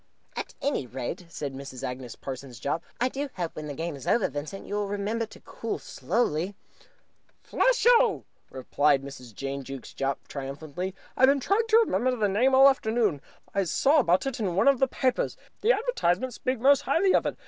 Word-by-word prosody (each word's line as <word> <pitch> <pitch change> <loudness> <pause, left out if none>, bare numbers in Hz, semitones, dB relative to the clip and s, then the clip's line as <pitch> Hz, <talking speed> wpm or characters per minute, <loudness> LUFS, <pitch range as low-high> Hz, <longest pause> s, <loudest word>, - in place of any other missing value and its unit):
"At - - -5
any 275 - 0
rate," 135 +8 -5
said 145 -4 -5
Mrs. 135 -1 -8
Agnes 125 -2 -5
Parsons 130 -3 -8
Jopp, 160 +7 -2 0.2
"I 245 - +3
do 275 +2 -4
hope, 175 -3 -4
when 155 0 -6
the 145 - -5
game 165 +1 -3
is 135 - -10
over, 235 - +3
Vincent, 150 +7 -6
that - - -14
you - - -6
will 205 -1 0
remember 205 +3 -2
to - - -14
cool - - -5
slowly." 190 -4 -1 0.9
"Flesho!" - - +3 0.5
cried 145 -2 +4
Mrs. 130 -3 -9
Jane 135 +2 -4
Jukes 135 -1 -8
Jopp 135 0 -3
triumphantly. 150 +7 -5 0.2
"I've 260 - +5
been 275 +1 +4
trying 410 - +1
to 445 0 +5
remember 255 - +2
the 215 -4 +1
name 245 +7 +3
all 265 - +7
the 275 - +9
afternoon. 220 - 0 0.3
I 195 - +2
saw 280 - +3
about 185 -5 +3
it 270 -1 -3
in 190 -6 -1
one 195 - +3
of 275 -3 +5
the 270 - +4
papers. 255 0 0 0.2
The 445 - +4
advertisements 260 - 0
speak 255 -2 -1
most 275 +3 +5
highly 370 +6 +2
of - - +3
it. - - -4
195 Hz, 195 wpm, -27 LUFS, -, 0.9 s, the